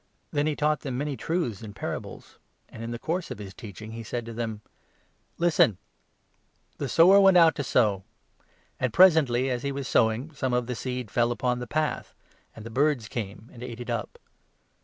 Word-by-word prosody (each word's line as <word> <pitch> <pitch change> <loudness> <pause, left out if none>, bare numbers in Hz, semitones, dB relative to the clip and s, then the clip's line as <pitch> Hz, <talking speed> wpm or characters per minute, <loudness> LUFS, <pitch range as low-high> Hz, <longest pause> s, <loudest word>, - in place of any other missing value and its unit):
Then 145 0 +1
2 - - +2
he 150 - -1
taught 150 +1 +1
them 130 -4 -4
many 145 +1 -2
truths 145 - -2
in 105 -3 -9
parables; - - -7 0.3
and 110 - -10
in 115 - -5
the 120 - -4
course 165 +8 -3
of - - -6
his 100 -2 -9
teaching 110 +1 -9
he 115 +1 -6
said 115 +1 -4
to 115 - -7
them: 110 -2 -4 0.4
" - - -41
Listen! 115 - +4 1.0
The 140 - -3
sower 185 +8 +7
went 190 -2 +6
out 165 -2 +7
to 140 - -1
sow; 105 -7 +2 0.8
and 125 -2 0
presently, 140 -7 +5
as 125 -1 -2
he 140 - -3
3, - - -3
4 - - -8
was 140 -1 -4
sowing, 120 +7 +1
some 130 -3 -2
of 125 -1 0
the 125 - -3
seed 125 -1 -5
fell 120 0 +2
along 125 0 -1
the 125 - -6
path; 155 +4 -2 0.4
and 110 - -10
the 115 - -7
birds 135 -3 +1
came, 105 0 -6
and 120 - -12
ate 120 -2 -7
it 120 - -5
up. - - -4
125 Hz, 210 wpm, -27 LUFS, 115-150 Hz, 1.0 s, sower